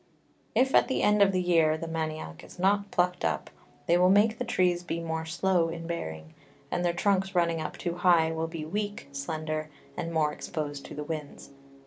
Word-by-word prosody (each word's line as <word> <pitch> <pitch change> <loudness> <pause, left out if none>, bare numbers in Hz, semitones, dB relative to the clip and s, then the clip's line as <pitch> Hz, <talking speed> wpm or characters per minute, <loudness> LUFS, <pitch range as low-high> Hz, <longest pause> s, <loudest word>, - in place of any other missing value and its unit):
If 265 +1 +3
at - - +5
the 260 - 0
end 210 0 +4
of 195 -1 +6
the 185 - +1
Year 165 -3 +3
the 165 - -5
Manioc 155 - -4
is - - -13
not 200 +2 +2
plucked 180 -1 0
up, 80 -3 -1 0.3
they 175 +1 +3
will 180 0 +5
make 215 +3 +4
the - - 0
Trees 180 -7 +1
be 170 -1 -3
more 160 -1 -3
slow 175 0 +1
in 165 0 -6
bearing; 80 - -5 0.4
and 175 - 0
their 175 - +2
Trunks 190 +1 +1
running 170 -2 +2
up - - -5
too 175 -1 -3
high, 170 -3 +4
will 160 0 -2
be 165 -2 -6
weak, 205 +5 -4
slender, 155 +2 -3 0.3
and 165 - -4
more 155 -2 +1
exposed 145 -4 -5
to - - -9
the 150 - -4
Winds. 150 -2 -6
170 Hz, 200 wpm, -28 LUFS, 155-185 Hz, 0.4 s, of